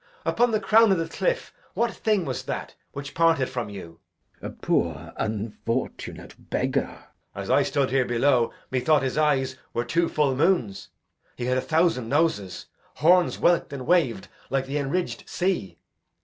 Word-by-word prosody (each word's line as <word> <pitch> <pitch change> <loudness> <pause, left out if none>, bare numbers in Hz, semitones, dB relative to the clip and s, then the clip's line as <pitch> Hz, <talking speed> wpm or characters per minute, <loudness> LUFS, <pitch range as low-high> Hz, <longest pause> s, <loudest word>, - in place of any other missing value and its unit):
Upon 240 +1 +2
the 215 -2 +1
crown 220 0 +5
o' 165 -3 +1
th' 165 - -13
cliff - - -1 0.2
what 235 0 +1
thing 210 -5 0
was 130 - -3
that - - -4 0.2
Which 140 0 -7
parted 165 -5 +3
from 120 -4 -4
you? 85 -5 -10 0.4
Glou. - - -5
A - - -5
poor 85 0 -1
unfortunate 110 +3 -4 0.2
beggar. - - -2 0.3
Edg. - - -4
As - - -8
I - - +5
stood 140 -3 0
here 135 -1 +2
below, 120 0 +2 0.2
methought 140 +3 +2
his 130 - -1
eyes 135 -4 +1 0.2
Were 120 - 0
two 170 +7 +1
full 145 -3 +1
moons; 140 - +1 0.5
he 120 - -4
had 125 +1 +1
a - - -2
thousand 160 -8 +1
noses, 140 - 0 0.3
Horns 175 +3 +4
whelk'd 170 -4 +2
and 130 -2 -6
wav'd 155 - +2 0.2
like 135 -1 0
the 140 +2 -3
enridged 145 +6 -3
sea. 175 - -1
140 Hz, 165 wpm, -25 LUFS, 120-170 Hz, 0.5 s, crown